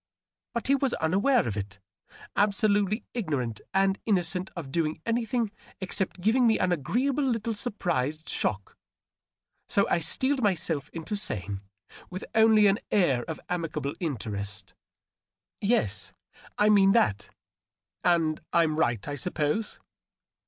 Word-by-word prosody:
But 235 Hz, -, -2 dB
he 275 Hz, -, +3 dB
was 275 Hz, -2 st, +1 dB
unaware 195 Hz, -, +2 dB
of 105 Hz, -, -2 dB
it 100 Hz, -1 st, -5 dB, 0.3 s
— -, -, -21 dB, 0.2 s
absolutely 205 Hz, +1 st, +2 dB
ignorant 140 Hz, -, -2 dB
and 195 Hz, 0 st, +2 dB
innocent 185 Hz, -2 st, +1 dB
of 155 Hz, -6 st, -6 dB
doing 160 Hz, 0 st, -1 dB
anything 230 Hz, -1 st, 0 dB, 0.3 s
except 190 Hz, 0 st, -2 dB
giving 235 Hz, +5 st, +4 dB
me 220 Hz, -, +4 dB
an 185 Hz, -, +1 dB
agreeable 255 Hz, -, 0 dB
little 230 Hz, -3 st, 0 dB
sur 220 Hz, +3 st, -2 dB
prised 155 Hz, -, -2 dB
shock. 100 Hz, -2 st, -2 dB, 0.9 s
So 200 Hz, -, +3 dB
I -, -, +2 dB
steeled 260 Hz, -, +1 dB
myself 165 Hz, -, 0 dB
into 165 Hz, +5 st, -5 dB
saying, 100 Hz, -, -2 dB, 0.5 s
with 185 Hz, +1 st, -6 dB
only 220 Hz, -1 st, +6 dB
an 200 Hz, +1 st, +4 dB
air 140 Hz, -12 st, +2 dB
of 160 Hz, -, -5 dB
amicable 165 Hz, -5 st, -2 dB
interest, 105 Hz, -, -4 dB, 0.3 s
— -, -, -66 dB
" -, -, -66 dB
Yes, 100 Hz, -, 0 dB, 0.4 s
I 210 Hz, -, +4 dB
mean 195 Hz, -2 st, +6 dB
that. 110 Hz, -, +2 dB, 0.7 s
And 165 Hz, -3 st, +2 dB
I'm 160 Hz, -2 st, +2 dB
right, 120 Hz, -9 st, 0 dB
I 145 Hz, -, -3 dB
suppose 150 Hz, -, -1 dB
180 Hz, 140 wpm, -27 LUFS, 145-215 Hz, 0.9 s, only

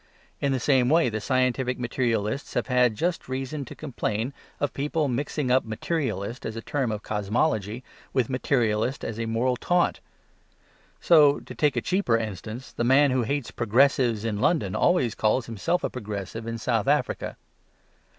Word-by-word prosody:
In 140 Hz, -, 0 dB
the 130 Hz, -, +1 dB
same 130 Hz, 0 st, +3 dB
way 160 Hz, -3 st, +4 dB
the 110 Hz, -1 st, -3 dB
scientific 130 Hz, 0 st, +1 dB
materialists 120 Hz, -1 st, -1 dB
have -, -, +1 dB
had 125 Hz, -3 st, +3 dB
just 170 Hz, +4 st, -2 dB
reason 135 Hz, +2 st, -3 dB
to -, -, -10 dB
complain 120 Hz, -3 st, -3 dB, 0.3 s
of 145 Hz, -, -1 dB
people 150 Hz, +2 st, -1 dB
mixing 135 Hz, +1 st, -1 dB
up 130 Hz, +1 st, +4 dB
"materialist" 115 Hz, -, -3 dB
as 110 Hz, -, -4 dB
a 115 Hz, -, -5 dB
term 135 Hz, -6 st, -1 dB
of 105 Hz, 0 st, -4 dB
cosmology 110 Hz, +2 st, -1 dB, 0.3 s
with 130 Hz, -4 st, +1 dB
"materialist" 125 Hz, -2 st, 0 dB
as 110 Hz, 0 st, -4 dB
a 115 Hz, -, -2 dB
moral 120 Hz, +3 st, 0 dB
taunt. 175 Hz, +5 st, +1 dB, 1.0 s
So, 150 Hz, -4 st, +5 dB
to -, -, -10 dB
take 150 Hz, -2 st, +1 dB
a -, -, 0 dB
cheaper 180 Hz, -11 st, +1 dB
instance, 110 Hz, +3 st, -6 dB
the -, -, -2 dB
man 135 Hz, +3 st, +5 dB
who 130 Hz, 0 st, +2 dB
hates 140 Hz, +2 st, -2 dB
"progressives" 120 Hz, -1 st, +2 dB
in 105 Hz, -2 st, -2 dB
London 105 Hz, -, +1 dB
always 135 Hz, -11 st, +2 dB
calls 110 Hz, +3 st, +1 dB
himself 115 Hz, -, -1 dB
a -, -, 0 dB
"progressive" 105 Hz, -1 st, -6 dB
in 115 Hz, 0 st, -3 dB
South 115 Hz, -, 0 dB
Africa. -, -, 0 dB
125 Hz, 165 wpm, -26 LUFS, 110-140 Hz, 1.0 s, So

